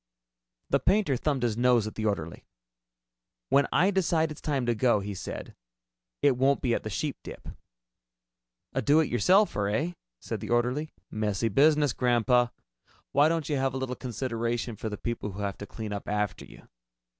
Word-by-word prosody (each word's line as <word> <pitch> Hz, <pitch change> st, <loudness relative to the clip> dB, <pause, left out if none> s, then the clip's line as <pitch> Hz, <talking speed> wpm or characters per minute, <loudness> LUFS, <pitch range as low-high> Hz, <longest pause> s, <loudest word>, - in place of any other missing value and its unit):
The -, -, +4 dB
painter 195 Hz, -7 st, +2 dB
thumbed 135 Hz, 0 st, -1 dB
his 115 Hz, -3 st, +1 dB
nose 120 Hz, -2 st, +3 dB
at 110 Hz, -, -5 dB
the 110 Hz, 0 st, -2 dB
orderly. 85 Hz, -6 st, -3 dB, 1.0 s
"When 140 Hz, 0 st, +4 dB
I 190 Hz, +3 st, +4 dB
decide 165 Hz, -4 st, +1 dB
it's 150 Hz, -, -9 dB
time 140 Hz, -4 st, -1 dB
to 120 Hz, -, +2 dB
go," 115 Hz, -1 st, +3 dB
he 100 Hz, +1 st, -5 dB
said, 95 Hz, -, -7 dB, 0.7 s
"it 140 Hz, -4 st, +4 dB
won't 135 Hz, +2 st, +2 dB
be 120 Hz, -3 st, +2 dB
at -, -, 0 dB
the 110 Hz, -, -5 dB
Sheepdip." 135 Hz, +8 st, -5 dB, 1.2 s
"A 135 Hz, -, 0 dB
do 145 Hz, +6 st, +4 dB
it 160 Hz, -, +1 dB
yourselfer, 150 Hz, -, +3 dB
eh?" 155 Hz, +11 st, -1 dB, 0.3 s
said -, -, -5 dB
the -, -, -7 dB
orderly. 125 Hz, +6 st, 0 dB, 0.2 s
"Messy 110 Hz, +1 st, -1 dB
business, 145 Hz, +4 st, +4 dB
Grandpa. 120 Hz, 0 st, +3 dB, 0.6 s
Why 145 Hz, +3 st, +5 dB
don't 165 Hz, -3 st, -1 dB
you 145 Hz, -, 0 dB
have 135 Hz, 0 st, 0 dB
a -, -, -1 dB
little 130 Hz, -1 st, -3 dB
consideration 120 Hz, -1 st, -3 dB
for 110 Hz, +2 st, -4 dB
the 105 Hz, -, -5 dB
people 115 Hz, -4 st, -4 dB
who 100 Hz, -, -6 dB
have 100 Hz, -2 st, -3 dB
to 100 Hz, -, -7 dB
clean 110 Hz, -2 st, -6 dB
up 100 Hz, -, -6 dB
after 105 Hz, -1 st, -2 dB
you?" -, -, -16 dB
125 Hz, 180 wpm, -28 LUFS, 110-145 Hz, 1.2 s, Why